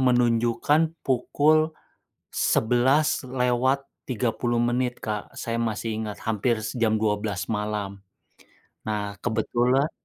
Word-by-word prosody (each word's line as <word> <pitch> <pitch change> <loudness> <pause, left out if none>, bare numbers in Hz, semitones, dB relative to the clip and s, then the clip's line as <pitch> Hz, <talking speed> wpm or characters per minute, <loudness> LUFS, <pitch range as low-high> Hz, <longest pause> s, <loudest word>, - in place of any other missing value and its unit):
menunjukkan 125 +6 +2
pukul 150 +5 +3 0.6
11:30 125 -1 +1
menit, 120 +1 0
Kak, 105 -1 -4
saya 115 - -2
masih 110 -1 -2
ingat 105 -1 -6
hampir 110 +1 +1
se 110 - -4
jam 110 -1 +3
12.00 105 -4 -1
malam. 105 -2 -3 0.8
Nah, 105 -2 -3
kebetulan 120 +6 +1
120 Hz, 90 wpm, -25 LUFS, 110-130 Hz, 0.8 s, pukul